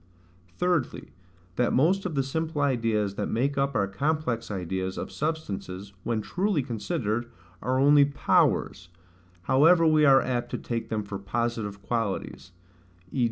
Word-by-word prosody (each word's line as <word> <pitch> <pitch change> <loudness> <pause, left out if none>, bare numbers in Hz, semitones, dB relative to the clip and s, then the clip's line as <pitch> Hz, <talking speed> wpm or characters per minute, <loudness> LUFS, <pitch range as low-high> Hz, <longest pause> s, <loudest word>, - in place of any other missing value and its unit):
Thirdly, 175 -7 -1 0.5
That 125 - +2
most 185 +8 +2
of 165 - -6
the 135 - +2
simple 160 +3 -3
ideas 115 -7 +1
that - - -1
make 135 +5 0
up 140 -1 0
our 100 -2 +2
complex 125 +2 -1
ideas 95 -1 -3
of - - -5
substances, 100 - -4
when 115 -2 -1
truly 180 - 0
considered, 120 -1 -2 0.3
are 130 +3 0
only 145 +1 +6
POWERS, 140 -9 +1 0.5
however 160 - +5
we 155 -1 +4
are 135 -2 +7
apt 125 -2 -2
to - - -3
take 115 -1 -4
them 110 -1 -1
for 100 -1 -6
positive 105 -1 -3
qualities; 100 -5 -3 0.6
v. - - -3
125 Hz, 145 wpm, -27 LUFS, 105-150 Hz, 0.6 s, are